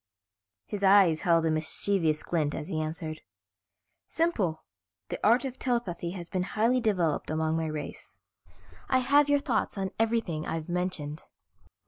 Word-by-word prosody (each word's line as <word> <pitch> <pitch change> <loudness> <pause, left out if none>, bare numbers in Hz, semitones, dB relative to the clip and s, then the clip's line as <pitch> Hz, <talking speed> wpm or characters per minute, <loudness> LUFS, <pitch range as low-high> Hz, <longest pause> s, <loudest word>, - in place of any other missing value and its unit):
His 205 -1 -5
eyes 190 -5 +5
held 165 -2 +3
a 160 - +2
mischievous 155 0 0
glint 155 -4 -1
as 150 - -5
he 155 - -1
answered. 155 0 -5 0.9
"Simple, 220 - 0 0.5
the - - -4
art 235 +6 +4
of 260 -1 -6
telepathy 220 -9 -1
has 175 -3 -7
been 185 - -2 0.2
highly 240 +4 +3
developed 180 -9 0
among 160 0 0
my 160 0 -1
race. 155 -1 -7 0.7
I 260 - +4
have 285 +3 +4
your 285 - +5
thoughts 255 -8 -1
on 190 -1 -2
everything 225 -9 0
I've 160 0 -4
mentioned. 175 -4 -2
180 Hz, 145 wpm, -28 LUFS, 160-225 Hz, 0.9 s, eyes